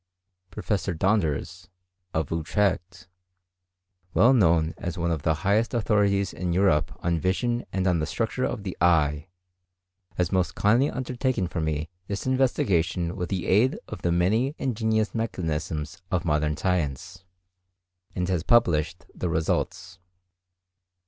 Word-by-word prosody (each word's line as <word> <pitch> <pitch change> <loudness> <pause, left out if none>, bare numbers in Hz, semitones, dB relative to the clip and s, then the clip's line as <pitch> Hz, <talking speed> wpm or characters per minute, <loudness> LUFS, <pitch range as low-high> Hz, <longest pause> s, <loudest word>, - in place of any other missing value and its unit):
Professor 95 -1 -2
Donders, 85 -2 0 0.4
of 80 -3 -2
Utrecht, 90 +1 -1 1.1
well 125 +4 +6
known 85 -8 +3
as 90 +1 -4
one 85 0 0
of 80 -3 -1
the 80 +1 +1
highest 110 +5 +2
authorities 100 -4 +1
in 90 -1 -2
Europe 90 -5 +2
on 85 -1 +1
vision 120 +8 -1
and 95 -1 -1
on 90 -3 +2
the 75 - -1
structure - - -2
of 100 - -2
the 95 -3 -5
eye, 75 -3 +3 0.9
has 90 -2 0
most 90 -2 0
kindly 115 +7 +3
undertaken 130 -4 -1
for 85 -1 -3
me 80 0 -2 0.2
this 100 0 -4
investigation 95 -10 +1
with 90 -3 -4
the 95 -3 -2
aid 110 +7 +3
of 105 - -8
the 85 - 0
many 110 - +1
ingenious 110 -3 0
mechanisms 80 -8 -3
of 90 0 -1
modern 75 -1 +1
science, 90 +1 -2 0.9
and 90 -1 -1
has 90 -3 0
published 85 -6 +2
the 90 - -3
results. 85 +3 -2
90 Hz, 135 wpm, -26 LUFS, 85-105 Hz, 1.1 s, well